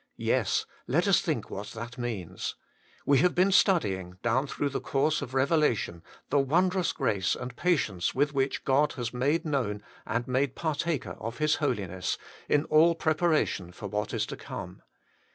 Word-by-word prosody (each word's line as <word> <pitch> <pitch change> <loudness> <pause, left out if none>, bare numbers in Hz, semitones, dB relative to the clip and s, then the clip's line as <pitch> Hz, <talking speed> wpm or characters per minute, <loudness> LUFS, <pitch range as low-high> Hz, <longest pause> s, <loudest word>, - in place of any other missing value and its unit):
Yes, - - +1 0.2
let - - +2
us - - +5
think - - -2
what 100 +1 -5
that 115 +2 -7
means. 100 -8 -4 0.5
We 140 -2 +4
have 180 +4 +3
been 185 +2 +4
studying, 95 - +2
down 125 +4 +1
through 145 +1 -2
the - - -3
course 145 +3 +1
of 125 - -6
Eevelation, 135 - +1 0.3
the 145 - +4
wondrous 180 +6 +2
grace 100 - 0
and 125 0 -7
patience 120 - 0
with 145 +2 +2
which 135 -1 -1
God 140 +2 +3
has 120 -2 -4
made 145 +7 +1
known 120 -9 -1 0.2
and 115 +2 -1
made 130 +1 0
par 160 -2 -1
taker 150 -3 -2
of 115 +1 -5
His 155 0 +2
holiness, 95 - -1 0.5
all 160 +2 +6
in - - -16
preparation 155 - +1
for 90 - -10
what 105 +1 -2
is - - 0
to - - -6
come. - - -8
135 Hz, 170 wpm, -28 LUFS, 110-155 Hz, 0.5 s, all